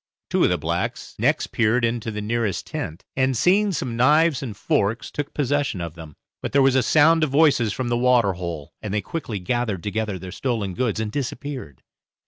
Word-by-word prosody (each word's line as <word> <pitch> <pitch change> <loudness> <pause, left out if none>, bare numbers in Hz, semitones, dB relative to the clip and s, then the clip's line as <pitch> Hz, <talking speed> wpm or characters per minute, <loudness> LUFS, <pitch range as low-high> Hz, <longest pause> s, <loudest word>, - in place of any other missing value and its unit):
Two - - +3
of - - +4
the - - +1
blacks - - -3
next - - +1
peered 115 +2 +2
into 115 -1 -2
the 105 -1 -4
nearest 110 -2 -1
tent, 80 +4 -6
and 130 -1 +1
seeing 200 - +3
some 130 -8 -3
knives 150 +4 +4
and 115 -7 -6
forks, 105 +4 0
took 145 -1 -4
possession 145 -6 0
of 85 -2 -5
them. 80 -3 -11 0.3
But - - -4
there 140 -1 +5
was 135 -1 +4
a 130 - +4
sound 160 +6 +4
of 155 - +1
voices 140 -6 +3
from 125 +3 -3
the 120 - +1
waterhole, 95 - +1
and 105 - -5
they 105 - +1
quickly 115 - -4
gathered 105 -1 -2
together 105 -1 -2
their 90 0 -8
stolen 110 -7 -2
goods 115 +2 -1
and 110 -1 -2
disappeared. 130 - -5
120 Hz, 195 wpm, -23 LUFS, 100-135 Hz, 0.3 s, there